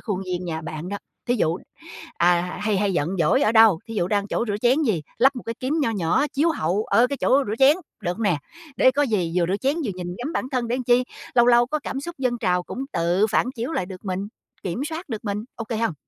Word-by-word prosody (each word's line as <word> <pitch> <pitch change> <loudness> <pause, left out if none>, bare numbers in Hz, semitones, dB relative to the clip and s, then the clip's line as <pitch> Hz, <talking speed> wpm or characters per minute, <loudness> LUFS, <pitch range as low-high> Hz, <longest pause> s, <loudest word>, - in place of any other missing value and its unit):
khuôn 200 -5 -3
viên 180 0 -3
nhà 160 -2 -3
bạn 155 +2 -6
đó, 205 - -3 0.3
thí 245 - +3
dụ, 170 -3 +1 0.6
à, 175 +1 +2
hay 210 -2 +1
hay 200 -1 +1
giận 165 0 0
dỗi 260 +11 +3
ở 225 - +3
đâu, 220 -7 +6
thí 225 - -6
dụ 175 -3 +1
đang 205 0 0
chỗ 235 - -1
rửa 205 -1 -1
chén 255 +7 +3
gì, 200 - +1 0.2
lắp 270 +2 +4
một - - -7
cái 230 - -3
kính 290 +5 -1
nho 270 - +1
nhỏ 195 - +1
chiếu 320 +4 +2
hậu 185 - 0
ở 245 +2 +3
cái 280 - -3
chỗ 275 +2 +4
rửa 215 - -1
chén, 280 +5 +6 0.3
được 175 - 0
hông 225 - -3
nè? 180 -7 +2 0.4
Để 260 - +6
có 285 +2 +1
gì 185 -9 0
vừa 175 -2 +3
rửa 195 +3 0
chén 275 +7 0
vừa 205 - -1
nhìn 180 -1 -5
ngắm 285 +7 -4
bản 260 - -2
thân 245 -3 -1
để 245 +2 -1
chi, 245 0 +4 0.3
lâu 240 0 +6
lâu 240 0 +6
có 305 +2 -1
cảm 270 -1 -5
xúc 345 +3 -6
dâng 245 -2 0
trào 180 -5 +1
cũng 265 +8 -5
tự 175 +5 +2
phản 255 - +2
chiếu 240 +6 -3
lại 185 - -1
được 190 +1 -10
mình, 190 +2 -2 0.4
kiểm 190 +7 -3
soát 325 0 -6
được 225 -1 -5
mình, 210 +1 -2
ô 230 - -5
kê 225 -1 -3
hông? 225 -7 0
220 Hz, 265 wpm, -23 LUFS, 180-255 Hz, 0.6 s, đâu